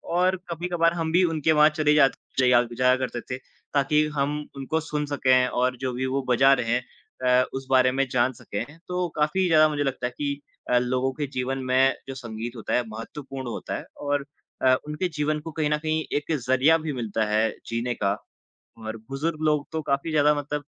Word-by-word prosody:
और 185 +1 +3
कभी-कभार 170 0 +1
हम 165 -2 -2
भी 180 +3 +4
उनके 160 -2 +1
वहाँ 150 0 +6
चले 150 -1 +2
जात 140 -3 +5 0.3
जया 125 -2 +5
जाया 125 +1 +4
करते 125 -2 -3
थे 125 - -5 0.4
ताकि 150 +2 +3
हम 145 +1 0 0.2
उनको 140 +4 -1
सुन 150 -2 -3
सकें 130 -3 +3
और 125 +1 0
जो 130 +1 -2
भी 130 +2 -2
वो 135 +1 0
बजा 135 +3 +6
रहे 125 -3 0
हैं 125 +1 0 0.6
अ, - - +1
उस 135 0 -4
बारे 130 -1 +5
में 135 +1 0
जान 125 +1 +2
सकें। 105 -1 -5 0.2
तो 180 0 -1
काफ़ी 155 +5 +1
ज़्यादा 155 -2 +6
मुझे 145 -1 -1
लगता 135 -3 -2
है 125 - -8
कि 145 -1 -2 0.3
अ, 125 - +4
लोगों 130 +2 0
के 145 +1 -3
जीवन 130 +1 -1
में 130 +1 +3
जो 135 - -6
संगीत 120 -1 -6
होता 115 - -4
है 125 - +3
महत्वपूर्ण 130 +4 -7
होता - - -4
है - - -8 0.2
और 145 -1 0 0.4
अ, 130 0 +5
उनके 150 +5 -1
जीवन 150 +1 0
को 160 +1 -7
कहीं 155 -1 -1
न 150 - +2
कहीं 155 +1 -1
एक 150 +2 -4 0.2
ज़रिया 130 +5 +5
भी 150 - -2
मिलता 115 -3 -1
है 110 +1 +2 0.2
जीने 115 +1 -1
का 100 0 0 0.6
और 110 0 -6
बुजुर्ग 155 +3 -2
लोग 150 -2 +2
तो 160 - -1
काफ़ी 140 +2 -1
ज़्यादा 150 -1 +4
मतलब 145 0 -3
135 Hz, 205 wpm, -25 LUFS, 125-150 Hz, 0.6 s, वहाँ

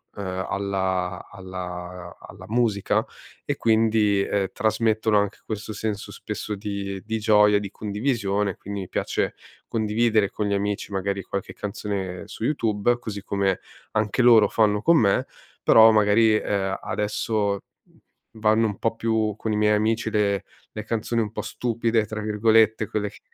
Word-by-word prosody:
uhm, 95 -2 -4
alla 95 -2 -2
alla 90 -2 -7
alla - - -12
musica 110 -4 +1 0.4
e - - -1
quindi, 110 -3 +2
uhm, 100 -2 +1
trasmettono 110 0 +1
anche 100 0 0
questo 110 0 -5
senso 105 -1 -4
spesso 105 - -5
di 100 -1 -5
di 110 0 -2
gioia, 105 -1 +5
di 100 -1 -6
condivisione 105 -2 -1
e - - -13
quindi 100 0 -6
mi 95 - -8
piace - - -1 0.4
condividere 110 -1 +2
con 105 - -3
gli 100 - 0
amici 100 +1 -2
magari 100 0 -2
qualche 100 +1 -5
canzone 100 -3 -4
su - - -8
YouTube, 115 -3 +1
così 105 -4 -6
come 100 -2 0 0.3
anche 110 +2 +1
loro 115 -4 +7
fanno 105 0 +2
con 170 0 +5
me, 100 -3 +2 0.4
però 110 0 +8
magari, 110 +1 +4
uhm, 100 -2 -1
adesso, 105 -1 -1 0.8
vanno 110 +1 +3
un 105 -2 -4
po' 115 0 0
più 110 -2 0
con 110 - -3
i - - 0
miei 105 0 +3
amici 110 +1 0
le 100 -2 +1 0.3
le 110 - -5
canzoni 115 +1 -1
un 105 -2 -3
po' - - -4
"stupide" 115 -2 0
tra 110 0 -5
virgolette, 110 0 +3
quelle 105 0 -2
che - - -16
105 Hz, 155 wpm, -24 LUFS, 100-110 Hz, 0.8 s, però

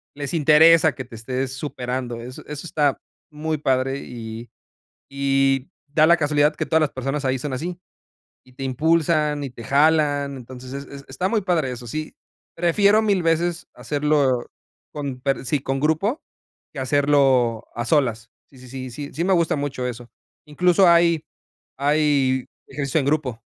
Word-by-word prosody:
les 145 -2 -5
interesa 160 +1 +6
que 130 - -6
te 120 -1 -12
estés 130 +3 -3
superando, 125 -3 -4
eso 125 +2 -9
eso 150 +2 -7
está 145 -3 +1 0.3
muy 155 +1 -3
padre 135 -1 0
y 115 -1 -8 0.6
y 135 -1 +1 0.2
da 155 +2 +4
la 170 +1 +5
casualidad 150 -1 +2
que - - -2
todas 160 - +2
las 150 - 0
personas 135 +2 -3
ahí 130 0 0
son 140 +2 -5
así 175 +6 -5 0.7
y 130 - -20
te 135 - -8
impulsan 150 +2 +1
y 135 - -4
te 120 -1 -11
jalan, 145 0 +2
entonces, 130 +1 -10
es 140 0 -6
es 140 0 -11
está 185 - -2
muy 220 0 +1
padre 170 -8 0
eso, 120 -1 -8
sí, 155 +6 -5 0.4
prefiero 200 +5 +3
1000 200 -5 +1
veces 165 +1 0
hacerlo 145 -4 0 0.5
con 140 -4 -5
per 135 0 -1
sí, 140 +3 0
con 135 0 -2
grupo, 160 - 0 0.5
que - - -11
hacerlo 130 -4 +2
a 120 +1 -3
solas, 120 -6 +1 0.2
sí 135 - -19
sí 130 - -13
sí 130 0 -7
sí 145 +3 -7
sí 165 - -2
me 190 - +2
gusta 170 -3 +2
mucho 140 -3 -3
eso, 120 0 -7 0.4
incluso 180 +5 +3
hay 170 -2 +4 0.5
hay 140 -3 +2 0.2
ejercicio 140 +1 -1
en 135 - -1
grupo. 140 -6 -1
140 Hz, 165 wpm, -22 LUFS, 130-155 Hz, 0.7 s, interesa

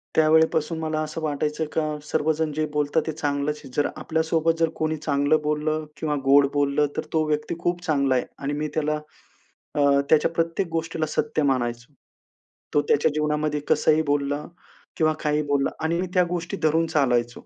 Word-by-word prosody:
त्यावेळेपासून 160 0 +3
मला 155 -1 -2
असं 155 +1 -5
वाटायचं, 150 +1 -1
का 155 -1 -1
सर्वजण 155 0 0
जे 155 0 0
बोलतात, 150 +2 +1
ते - - 0
चांगलंच 145 0 -1
आहे. 135 - -11
जर 145 - +2
आपल्या 160 +1 -1
सोबत 165 0 +2
जर 165 -1 +3
कोणी 155 0 -1
चांगलं 145 +1 +1
बोललं 155 +1 -1
किंवा 150 -2 -1
गोड 140 +1 +6
बोललं, 145 +1 +2
तर - - -2
तो 160 -1 +3
व्यक्ती 150 +2 -1
खूप 175 0 -1
चांगला 140 -4 +2
आहे 125 - 0 0.2
आणि 145 +1 -1
मी 155 - -1
त्याला, 150 -1 +1 0.8
अ, 145 - +2 0.3
त्याच्या 155 +1 +4
प्रत्येक 165 +2 0
गोष्टीला 165 -1 -2
सत्य 150 0 0
मानायचो. 125 -1 -1 0.8
तो 145 - +4
त्याच्या 150 +2 +3
जीवनामध्ये 150 0 0
कसंही 155 0 +4
बोलला 145 +1 -1 0.5
किंवा 155 -1 +3
काहीही 150 0 +1
बोलला 140 -1 +1
आणि 170 +2 0
मी 185 - -2
त्या 180 -1 +4
गोष्टी 175 -1 -3
धरून 160 +1 +3
चालायचो. 125 -5 0
150 Hz, 170 wpm, -24 LUFS, 145-160 Hz, 0.8 s, गोड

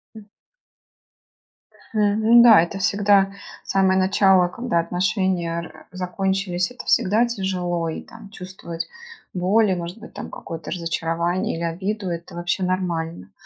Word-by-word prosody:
М. 215 -1 -12 1.7
Мгм. 215 +3 +4
Да, 220 -7 +8
это 195 +3 -3
всегда 200 0 +3 0.3
самое 190 -1 +2
начало, 190 -1 +4
когда 235 -2 -1
отношения 175 -1 0
р 160 -2 -13
закончились, 185 +1 -2
это 245 - -10
всегда 215 +6 +3
тяжело 180 -6 -2
и, - - -5
там, 225 -3 -13
чувствовать 180 -4 -7 0.5
боль 195 +3 +2
и, - - +1
может 175 +4 -6
быть, 230 - -12
там, - - -7
какое-то 165 0 -8
разочарование 170 +1 -1
или 170 - -4
обиду- 190 +4 -3
это 170 0 -6
вообще 175 +2 -2
нормально. 170 - -2
185 Hz, 130 wpm, -22 LUFS, 170-200 Hz, 1.7 s, Да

